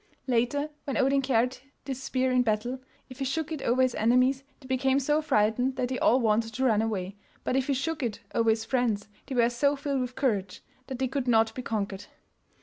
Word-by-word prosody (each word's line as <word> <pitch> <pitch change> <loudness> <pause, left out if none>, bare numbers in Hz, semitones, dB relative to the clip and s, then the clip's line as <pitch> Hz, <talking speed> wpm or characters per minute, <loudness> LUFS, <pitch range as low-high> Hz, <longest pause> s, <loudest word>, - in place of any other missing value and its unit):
Later, 260 +4 0
when 275 - -2
Odin 275 +1 +3
carried 250 -1 +1 0.3
this 265 -2 -4
spear 260 -1 0
in 255 0 +4
battle, 240 +3 -1 0.3
if 255 0 -12
he 270 - -1
shook 310 +4 -2
it 310 -3 -4
over 255 +2 +2
his 255 -1 +1
enemies 255 +4 +2 0.2
they 270 - -16
became 260 +1 +1
so 295 +3 +1
frightened 245 -1 +1
that 250 -1 -1
they 255 - -2
all 250 - +4
wanted 225 -1 +1
to 260 - -1
run 220 -4 +3
away, 200 -3 -3 0.3
but - - -1
if 265 -1 +1
he 280 - +1
shook 305 +3 -2
it 235 -5 -2
over 230 -1 +2
his 220 0 +1
friends 225 -4 0 0.2
they 265 - -4
were 235 -1 +4
so 280 +4 +1
filled 280 -1 -2
with 250 0 -4
courage 200 -8 -1 0.2
that 260 - -5
they 260 +1 0
could 265 0 -3
not 225 -2 +3
be 255 - -5
conquered. 205 -4 -3
255 Hz, 220 wpm, -28 LUFS, 225-270 Hz, 0.3 s, in